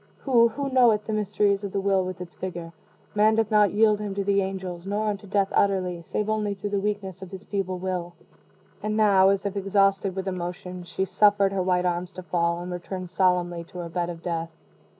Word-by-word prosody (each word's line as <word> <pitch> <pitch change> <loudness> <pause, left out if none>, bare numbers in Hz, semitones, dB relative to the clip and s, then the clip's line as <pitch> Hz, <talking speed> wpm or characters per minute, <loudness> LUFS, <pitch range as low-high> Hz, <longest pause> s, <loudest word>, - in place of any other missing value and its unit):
Who 240 -4 +5
who 275 +4 -4
knoweth 235 -5 +4
the 220 - -3
mysteries 205 -1 +1
of 200 - -5
the 200 - 0
will 195 -1 +2
with 185 -1 -6
its 180 0 -9
vigor? 170 -3 -6 0.4
Man 215 +1 +4
doth 225 -1 +1
not 210 -1 +5
yield 210 0 +3
him 205 -2 -4
to 200 - -1
the 200 0 +2
angels, 190 -2 -5
nor 205 +2 -1
unto 205 0 -5
death 195 0 +1
utterly, 185 -3 +1
save 210 +5 -3
only 210 -2 -1
through 200 +1 -5
the 200 - +1
weakness 195 -2 -3
of 190 - -8
his 190 0 -9
feeble 195 -2 -2
will." 180 -1 -4 0.7
And 215 +1 -2
now, 195 -3 +5
as 195 0 0
if 200 0 -2
exhausted 195 -1 +2
with 190 0 -4
emotion, 180 0 -5
she 190 +2 -2
suffered 200 -1 +3
her 190 - 0
white 180 0 +1
arms 180 +1 -2
to 185 - -8
fall, 170 0 0
and 180 +1 -6
returned 180 0 -6
solemnly 180 -2 +1
to 180 - -12
her 170 -1 -5
bed 175 +1 -2
of 170 -1 -8
death. 165 -1 -2
195 Hz, 215 wpm, -25 LUFS, 180-205 Hz, 0.7 s, Who